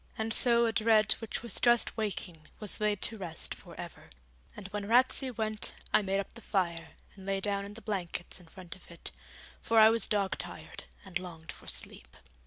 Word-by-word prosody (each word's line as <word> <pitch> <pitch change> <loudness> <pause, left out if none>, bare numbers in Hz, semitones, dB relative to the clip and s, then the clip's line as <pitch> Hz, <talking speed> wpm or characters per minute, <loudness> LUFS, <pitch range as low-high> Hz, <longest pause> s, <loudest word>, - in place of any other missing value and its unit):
And 220 0 0
so 235 -1 +7
a 225 - +2
dread 220 -1 +4
which 225 0 -4
was 235 -5 -2
just 240 -1 +3
waking 185 -7 -4
was 210 0 -5
laid 210 -2 +1
to 220 -1 -1
rest 170 -4 -3
for - - -13
ever; - - -9 0.5
and 200 - -7
when 205 0 -4
Ratsey 255 +3 +3
went 215 -2 -2 0.2
I - - +6
made 195 0 0
up 200 - -5
the 235 - -12
fire, 175 -6 -1 0.2
and 190 -1 -12
lay 195 0 0
down 200 0 -1
in 205 +1 -9
the 230 - -10
blankets 185 -3 -4
in 175 - -17
front 175 +1 -10
of 185 - -19
it, 170 - -8 0.5
for 225 - +1
I 220 0 +9
was 230 0 +1
dog 200 -2 0
tired - - -7 0.2
and 185 -2 -3
longed 165 -3 -9
for - - -15
sleep. 65 0 -5
205 Hz, 200 wpm, -31 LUFS, 185-225 Hz, 0.5 s, I